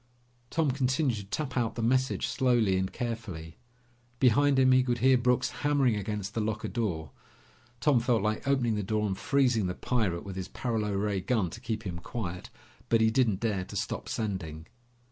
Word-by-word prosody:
Tom 160 -4 +1
continued 130 -1 +1
to 100 - -7
tap 130 +6 -4
out 115 -3 0
the 115 - -3
message 130 +3 +1
slowly 120 -7 +2
and 95 0 -1
carefully. 105 -10 -5 0.6
Behind 135 +3 +4
him, 130 -1 +5
he 130 0 +6
could 125 -1 0
hear 130 +2 +5
Brooks 125 +1 +2
hammering 140 -5 +3
against 105 0 -4
the 115 - -1
locker 110 0 -2
door. 85 - -2 0.7
Tom 145 -5 +4
felt 115 -3 +1
like 110 +5 -1
opening 130 -5 +2
the 105 - -1
door 105 +2 0
and 95 -2 -1
freezing 125 -5 +2
the 90 - -3
pirate 105 -9 -1
with 95 -1 -7
his 95 - -4
paralo 110 -4 -2
ray 100 -1 0
gun 100 -3 0
to - - -9
keep 110 -1 -3
him 90 -4 -5
quiet, 90 -3 -5 0.4
but 115 - +4
he 110 0 +4
didn't 110 -6 +2
dare 105 -5 0
to - - -10
stop - - -3
sending. 90 -8 -4
110 Hz, 185 wpm, -29 LUFS, 100-125 Hz, 0.7 s, he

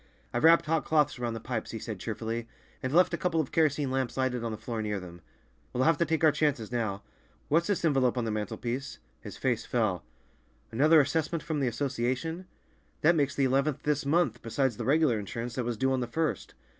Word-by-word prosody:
"I've 120 - -1
wrapped 165 +1 +6
hot 160 0 +1
cloths 150 -4 +1
around 120 -2 -2
the - - -4
pipes," 120 -2 -4
he 115 - -5
said 110 -2 -6
cheerfully, 115 +2 -4 0.3
"and 130 -1 -2
left 175 +3 +4
a - - 0
couple 170 -3 0
of 150 - -1
kerosene 150 -4 +1
lamps 130 -2 -2
lighted 130 -2 0
on 115 - -2
the 110 - -4
floor 115 0 -4
near 105 -2 -2
them. 85 -1 -11 0.5
We'll 125 - +1
have 165 +1 +3
to 170 - +3
take 160 0 -1
our 155 - +7
chances 145 -8 0
now. 110 -5 -2 0.5
What's 165 +3 +3
this 200 -4 0
envelope 135 -5 +2
on 120 - 0
the 110 - -1
mantelpiece?" 120 +5 -4 0.2
His - - -9
face - - 0
fell. - - 0 0.7
"Another 150 +7 +5
assessment 155 +3 -1
from 150 -1 -2
the 135 - +1
Association? 130 +8 -2 0.5
That 165 +3 +5
makes 140 -3 +1
the 140 - +2
eleventh 135 +2 +1
this 150 -1 0
month, 165 +5 +1
besides 120 0 -1
the - - -4
regular 140 -5 +3
insurance, 115 +4 -5
that 125 -1 -2
was 120 -2 -2
due 130 +3 +1
on 130 - +1
the 120 - -2
first." 160 +5 -2
130 Hz, 215 wpm, -29 LUFS, 115-155 Hz, 0.7 s, our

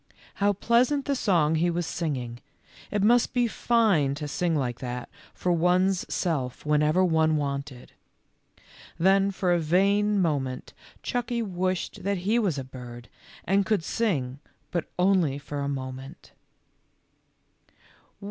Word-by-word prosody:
How 205 0 +1
pleasant 245 +7 +2
the 280 - 0
song 170 - +2
he 165 +2 +2
was 175 0 -1
singing! 130 -9 -3 0.5
It 205 -2 -1
must 240 +4 +3
be 245 -1 +3
fine 210 - +2
to 150 0 -5
sing 165 +3 0
like 125 -5 -2
that 125 -1 -5 0.2
for 180 - -2
one's 180 +2 +2
self 140 -9 -2
whenever 150 +4 +3
one 160 -2 +2
wanted. 140 -3 -4 1.1
Then 195 +3 +4
for 185 -2 0
a 175 - +2
vain 200 +5 +2
moment 135 -7 -1 0.3
Chucky 240 -1 -2
wished 185 -2 -2
that 200 +1 0
he 225 +4 +3
was 190 -10 0
a 135 - -3
bird, 120 -2 -10 0.4
and 195 +3 +3
could 210 -3 0
sing, 145 - -1 0.3
but 170 -3 -1
only 180 -6 +2
for 145 0 -6
a 140 0 -2
moment. 135 +1 -7
170 Hz, 135 wpm, -26 LUFS, 140-200 Hz, 1.1 s, Then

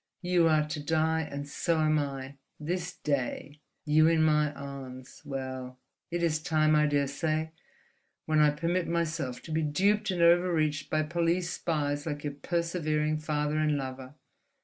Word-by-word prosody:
You 175 -2 +3
are 155 -1 +3
to 150 0 -3
die, 160 +2 +1
and 140 0 -5
so 160 +3 0
am 155 0 +3
I, 135 -1 -5 0.2
this 175 +3 -3
day—you 150 +2 -1
in 165 -1 +3
my 150 -1 +3
arms. 135 -2 -9
Well, 130 -2 -5 0.3
it 170 0 -2
is 155 -2 +1
time, 155 -1 +2
I 150 0 +4
daresay, 145 +2 0 0.7
when 155 -1 +2
I 150 -1 +6
permit 170 +4 -1
myself 160 -6 -2
to 160 - -9
be 160 +1 +1
duped 200 +8 +1
and 180 -2 +1
overreached 170 -4 +3
by 155 0 +1
police 170 +2 0
spies 145 -2 -2
like 145 -2 -4
your 145 -1 -3
persevering 155 -1 -1
father 150 0 -1
and 150 -1 +2
lover. 130 0 -6
155 Hz, 150 wpm, -29 LUFS, 145-165 Hz, 0.7 s, I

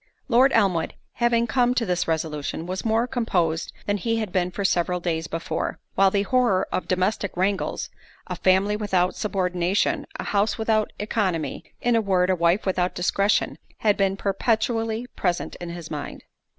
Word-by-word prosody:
Lord 260 +2 +5
Elmwood 190 -7 +2 0.2
having 235 -1 +2
come 245 +1 +2
to 235 - +1
this 180 -2 0
resolution, 160 -1 -2
was 185 +2 -4
more 225 +1 +2
composed 180 -10 0
than 205 0 0
he 230 +3 -1
had 215 -4 -2
been 180 -1 +1
for 195 +2 -4
several 180 -1 +1
days 165 -2 -2
before; 165 +1 -3
while 195 0 +5
the 200 +1 +1
horror 205 -4 +2
of - - -2
domestic 185 +1 0
wrangles—a 195 +2 -3
family 190 +2 +3
without 190 -4 +1
subordination—a 180 -2 -1
house 205 +1 +1
without 220 -1 +1
œconomy—in 210 +3 -1
a 225 - +4
word, 190 -3 +2
a - - +3
wife 170 +3 +2
without 185 -1 0
discretion, 200 +3 +1 0.2
had 210 -2 +3
been 195 -1 +1
perpetually 225 +3 0
present 175 -2 -1
to 175 - -6
his 170 -1 -8
mind. 150 -2 -6
195 Hz, 155 wpm, -24 LUFS, 180-220 Hz, 0.2 s, Lord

